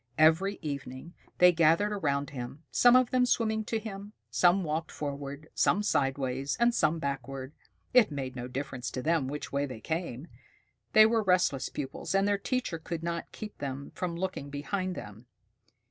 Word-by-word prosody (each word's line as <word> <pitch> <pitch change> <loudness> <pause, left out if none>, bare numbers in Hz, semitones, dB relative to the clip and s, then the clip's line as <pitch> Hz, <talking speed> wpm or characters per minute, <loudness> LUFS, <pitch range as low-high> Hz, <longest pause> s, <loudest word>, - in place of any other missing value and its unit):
Every 165 +6 +4
evening 140 +2 -6 0.2
they 180 0 +7
gathered 170 +5 +3
around 145 -8 -1
him, 130 +3 -7
some 245 0 +6
of 255 -1 +4
them 255 -1 +3
swimming 220 -3 +1
to 225 - -1
him, 205 -1 -7 0.2
some 180 +2 +4
walking 160 0 -2
forward, 145 +1 -5
some 205 - +2
sidewise, 135 -5 0
and 240 0 +4
some 155 -5 +2
backward. 135 -1 -4 0.4
It 250 -3 +6
made 135 -3 -5
no 125 -1 -5
difference 130 -2 -4
to 130 - -4
them 160 -4 +1
which 145 +1 -5
way 140 +1 0
they 125 -4 -8
came. 160 0 -4 0.7
They 215 -1 +9
were 225 0 +3
restless 180 -8 +2
pupils, 145 +6 -4
and 195 +1 +3
their 205 -1 +1
teacher 240 -7 -2
could 165 0 -5
not 170 0 -3
keep 210 -1 -8
them 140 0 -5
from 175 -2 -3
looking 180 -5 -4
behind 180 +6 -3
them. 105 +4 -9
160 Hz, 170 wpm, -29 LUFS, 140-195 Hz, 0.7 s, They